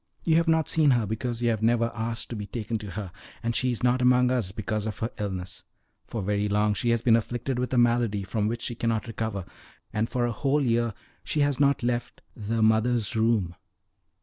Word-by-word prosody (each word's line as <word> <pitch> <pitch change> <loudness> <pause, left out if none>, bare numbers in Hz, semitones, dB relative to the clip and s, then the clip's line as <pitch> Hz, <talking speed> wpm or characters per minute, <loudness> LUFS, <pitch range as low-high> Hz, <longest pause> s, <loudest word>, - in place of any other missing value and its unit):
You 160 -1 +3
have 165 0 +2
not 160 -1 +3
seen 155 -3 +4
her 120 -4 +3
because 115 +3 -3
you 120 - +3
have 110 -2 0
never 115 +1 +2
asked 115 0 -4
to - - -3
be 105 -2 -5
taken 115 0 -3
to 105 -1 -7
her; 100 -1 -6 0.3
and 115 0 -1
she 130 0 +1
is 120 - -4
not 125 +1 +3
among 125 0 +4
us 120 -8 0
because 110 +1 -3
of 110 - -4
her 115 - -3
illness. 95 -3 -4 0.4
For 110 -4 -4
very 105 +1 0
long 105 +1 +2
she 120 +4 -1
has 115 -1 +2
been 115 -2 +5
afflicted 120 +3 -2
with 125 - -2
a 130 - +1
malady 120 -4 +2
from 105 +2 -1
which 115 +1 -3
she - - -2
cannot 115 -2 -1
recover, 110 -4 -4 0.5
and 110 +1 0
for 125 -1 0
a 120 - 0
whole 135 +6 +1
year 115 -3 +1 0.3
she 150 - -1
has 145 -2 +1
not 140 -3 +3
left 120 0 -2
the 110 +1 -1
Mother's 110 +1 +2
Room." 110 -6 +2
115 Hz, 220 wpm, -27 LUFS, 105-125 Hz, 0.5 s, been